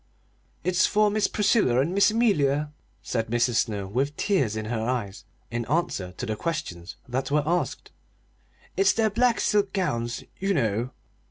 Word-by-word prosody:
"It's 180 +1 +3
for 210 0 +3
Miss 210 0 +2
Priscilla 205 - +2
and 155 +7 +1
Miss 200 +2 +5
Amelia,'" 150 - +2 0.3
said 115 -2 -2
Mrs. 120 +1 +1
Snow, 105 -4 0
with 135 +9 -2
tears 135 - +1
in 110 0 -3
her 110 0 -2
eyes, 110 -5 -3 0.3
in 120 0 -2
answer 125 - -1
to 125 - -5
the 110 -2 -2
questions 95 - -4
that 130 +2 -2
were 150 +1 +2
asked. 175 +3 -1 0.8
"It's 395 - +4
their 220 -1 +1
black 240 +2 +2
silk 205 -2 +1
gowns, 120 - -2 0.2
you 195 0 0
know." 115 -2 0
140 Hz, 160 wpm, -26 LUFS, -, 0.8 s, Miss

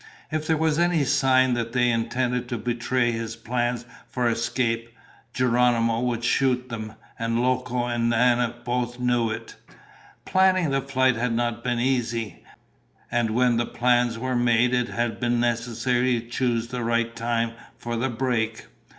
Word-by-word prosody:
If 155 0 -2
there 160 - +2
was 160 0 +1
any 175 -3 +2
sign 130 -1 +3
that 115 -1 -2
they 125 -1 +3
intended 120 +2 -1
to 120 - -2
betray 120 +2 0
his 115 0 -4
plans 120 +1 -2 0.2
for 125 -1 0
escape, 115 0 -1 0.4
Geronimo 120 -2 +2
would 120 -1 -1
shoot 125 0 +1
them, 110 -2 -6 0.3
and 115 0 0
Loco 125 -1 0
and 120 -1 0
Nana 120 0 +2
both 120 0 -2
knew 120 -2 +1
it. 110 - -6 0.7
Planning 185 -4 +3
the 135 0 +1
flight 130 -2 +1
had 120 0 0
not 120 0 -1
been 120 -1 0
easy. 120 -5 -1 0.7
And 120 -1 +1
when 120 +1 +2
the 120 - 0
plans 120 -1 +1
were 130 +2 -2
made 120 0 +3
it 125 -1 +1
had 120 -2 -2
been 120 -1 +1
necessary 120 +1 0
to 115 - -11
choose 120 -1 -1
the 125 -1 -3
right 115 0 0
time 115 0 -1 0.3
for 120 0 -4
the 125 +3 -1
break. 115 -2 -1
120 Hz, 160 wpm, -24 LUFS, 115-125 Hz, 0.7 s, sign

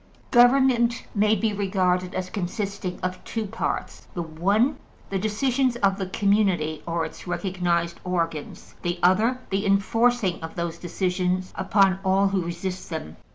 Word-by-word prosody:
Government 245 -1 +4
may 210 +1 +3
be 215 +1 0
regarded 185 -2 0
as 185 0 -3
consisting 200 -1 -3
of 185 0 -3
two 225 -2 -3
parts: 225 +3 -4
the 175 - -2
one, 200 - +1 0.3
the 195 - 0
decisions 250 +5 +1
of 195 -4 +1
the 190 - -2
community 190 -6 +1
or 165 -1 0
its 160 - -10
recognized 175 -2 -1
organs; 165 -4 -3
the 175 +1 -2
other, 215 +8 +4
the 195 +1 0
enforcing 200 0 +2
of 160 0 -7
those 170 -1 -3
decisions 180 +1 -1
upon 195 -2 +3
all 195 +1 +3
who 195 -1 0
resist 180 +2 -5
them. 160 - -6
190 Hz, 145 wpm, -25 LUFS, 180-215 Hz, 0.3 s, Government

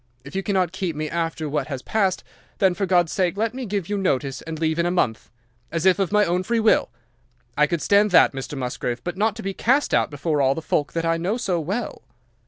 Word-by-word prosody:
If 140 +6 -11
you 195 - 0
cannot 190 -4 0
keep 185 -3 -3
me 155 0 -4
after 165 -2 -2
what 150 +1 -2
has 135 -3 -5
passed, 195 -4 0 0.3
then 190 -2 +3
for 195 +2 -2
God's 175 -3 +3
sake 185 -1 0
let 225 +2 0
me 255 -2 -5
give 200 -4 -2
you 205 -1 -2
notice 140 -7 -1
and 160 0 -6
leave 160 +1 0
in 170 - +2
a - - +1
month, 130 -11 -1 0.4
as 165 +1 -2
if 190 +1 +4
of 195 -1 0
my 210 0 +4
own 175 +1 0
free 230 +5 0
will. 220 - +3 0.7
I 150 0 +4
could 170 -2 -2
stand 205 +1 +4
that, 180 - +5
Mr. 135 +2 -6
Musgrave, 125 -1 -3
but 175 0 -4
not 210 +2 +1
to 225 - -8
be 195 0 -3
cast 265 +9 +1
out - - +3
before 150 +1 -1
all 135 0 +3
the 160 - -4
folk 145 -2 -1
that 165 0 -1
I 165 0 +2
know 185 +7 -1
so 190 -8 -1
well." 200 +9 -4
175 Hz, 245 wpm, -23 LUFS, 155-200 Hz, 0.7 s, that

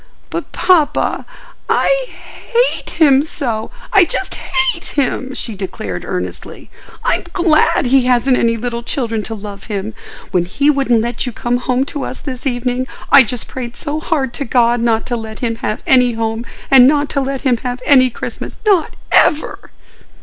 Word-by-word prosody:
"But, - - -5
papa, 345 -6 +1 0.4
I - - +2 0.5
hate - - +2
him 280 -4 +6
so—I 310 - -1
just 375 +2 0
hate 350 -1 0
him!" 265 -2 -2
she 230 - -1
declared, 190 -1 -5
earnestly. - - -6 0.3
"I'm - - 0
glad 335 -3 +3
he 255 0 +3
hasn't 250 +1 +3
any 230 -1 +1
little 235 +1 -3
children 230 -3 -2
to 225 +2 -5
love 200 -1 -9
him. 210 0 -4 0.4
When 175 -1 +1
he 280 +11 +2
wouldn't 270 -5 +2
let 240 +2 -3
you - - -2
come 240 +2 -1
home 250 +1 0
to 285 -1 -5
us 260 - -5
this 260 -1 -5
evening, 250 0 -1 0.2
I 280 - +9
just 245 -1 -1
prayed 245 -2 -6
so 300 0 -3
hard 280 -6 -1
to 280 - -2
God 240 -1 +2
not 225 -1 +1
to 245 - -2
let 220 -1 -7
him 230 -2 -1
have 215 - -3
any 250 -2 +4
home 225 +1 -3 0.2
and 260 -2 +8
not 290 0 +2
to 280 - 0
let 270 0 -3
him 255 -3 +2
have 250 +1 -4
any 255 -3 +5
Christmas—not 370 - -2 0.2
ever!" 305 -1 +2
255 Hz, 165 wpm, -16 LUFS, 235-285 Hz, 0.5 s, I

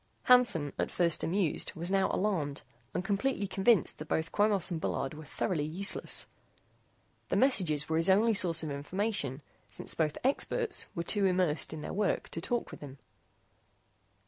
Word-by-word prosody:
Hansen, 240 - +4
at - - 0
first 170 -2 +2
amused, 180 -2 0
was 170 +3 -4
now 195 -1 +2
alarmed 165 -9 -2 0.3
and 180 - -3
completely 205 +2 -1
convinced 195 0 +1
that 155 - -7
both 160 +2 -2
Quemos 205 -3 +2
and 165 -2 -3
Bullard 135 -2 -2
were 155 0 -10
thoroughly 155 +2 -2
useless. 175 +7 0 1.0
The - - 0
messages 175 - +2
were 160 - 0
his 165 +3 +2
only 220 +4 +4
source 170 -5 +2
of 155 - -4
information, 145 - -2 0.3
since - - 0
both 155 -2 -1
"experts" 435 - 0
were 170 - -2
too 200 +2 +2
immersed 180 -4 +1
in 155 -1 -7
their - - -6
work 205 0 -1
to 165 - -6
talk 240 +6 -2
with - - -10
him. 140 -2 -10
180 Hz, 165 wpm, -30 LUFS, 155-205 Hz, 1.0 s, Hansen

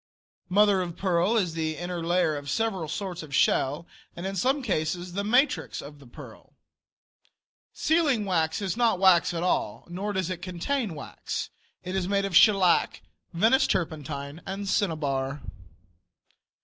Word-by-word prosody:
Mother 200 0 +4
of 170 -2 -5
pearl 185 +4 +1
is 180 -6 0
the 160 -1 -2
inner 175 -1 -4
layer 170 -2 +1
of 145 -1 -6
several 195 -1 -1
sorts 180 +3 -4
of 145 -3 -6
shell, 145 +4 +2 0.3
and 175 - -6
in 195 0 -3
some 265 +8 +1
cases 175 -3 -2
the 200 +2 -2
matrix 250 +8 +1
of 145 0 -10
the 140 - -15
pearl. 120 - -13 1.2
Sealing 300 -9 +1
wax 165 0 0
is 190 -1 -1
not 230 -4 +2
wax 185 -3 +5
at 170 0 -3
all 180 - -1
nor 190 +4 -4
does 185 -2 -1
it 180 -1 -5
contain 190 - -2
wax. 145 - -6 0.3
It 185 +1 -4
is 185 -2 -1
made 200 0 +1
of 195 -3 -3
shellac, 195 -3 +4 0.3
Venice 225 +10 +3
turpentine 150 -2 -3
and 195 +1 -5
cinnabar. 145 -8 -1
180 Hz, 150 wpm, -26 LUFS, 160-200 Hz, 1.2 s, wax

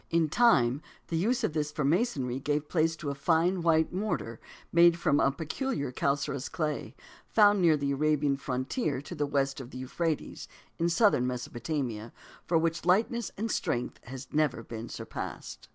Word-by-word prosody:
In 165 -2 +2
time, 145 - +4 0.3
the 165 - -2
use 235 +9 +1
of 190 - 0
this 150 -1 -1
for 150 - -2
masonry 140 - 0
gave 145 +2 -1
place 165 -1 +1
to 150 -3 -4
a - - -2
fine 170 +5 +1
white 160 -1 +2
mortar 185 - -3 0.3
made 170 0 +6
from 145 -4 +2
a - - +4
peculiar 160 - -3
calcareous 140 0 -1
clay, 150 -6 -3 0.3
found 205 -2 +5
near 165 -3 +5
the 140 -1 -1
Arabian 145 0 +1
frontier 135 - -2
to 175 - -8
the 145 -3 -1
west 135 -1 0
of 125 - -9
the 125 - -9
Euphrates 155 +5 -3 0.3
in 170 +1 +2
southern 170 - +3
Mesopotamia, 120 -2 -4 0.4
which 165 -1 +2
for 170 - -10
lightness 225 +4 +2
and 220 +2 -2
strength 125 -8 -2
has 130 +1 -8
never 150 -6 +1
been 115 0 -7
surpassed. - - -7
150 Hz, 170 wpm, -29 LUFS, 135-170 Hz, 0.4 s, made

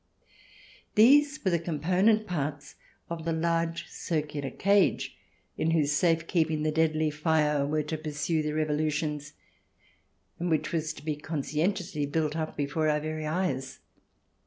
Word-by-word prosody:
These 285 +5 +5
were 190 - +3
the 170 - +2
com 165 -2 -4
ponent 195 +7 +3
parts 145 -4 -4 0.3
of 170 -1 -5
the 165 - -1
large 165 +1 0
circular 150 -4 -3
cage 200 +7 +2 0.4
in 160 - +1
whose 155 -3 +2
safe 165 +2 +2
keeping 160 -3 +1
the 155 - +1
"deadly 155 -1 +1
fere" 150 -2 +1
were 155 +1 0
to 155 +1 -4
pursue 155 +1 -1
their 150 0 -2
evolutions, 150 -1 -1 1.1
and 175 +1 -1
which 155 -1 0
was 160 -2 -1
to 150 - -13
be 155 -1 -1
conscientiously 155 +2 -2
built 155 +1 -1
up 160 -1 -3
before 150 +2 0
our 150 0 +2
very 155 0 -4
eyes. 150 -6 -2
155 Hz, 145 wpm, -28 LUFS, 150-170 Hz, 1.1 s, These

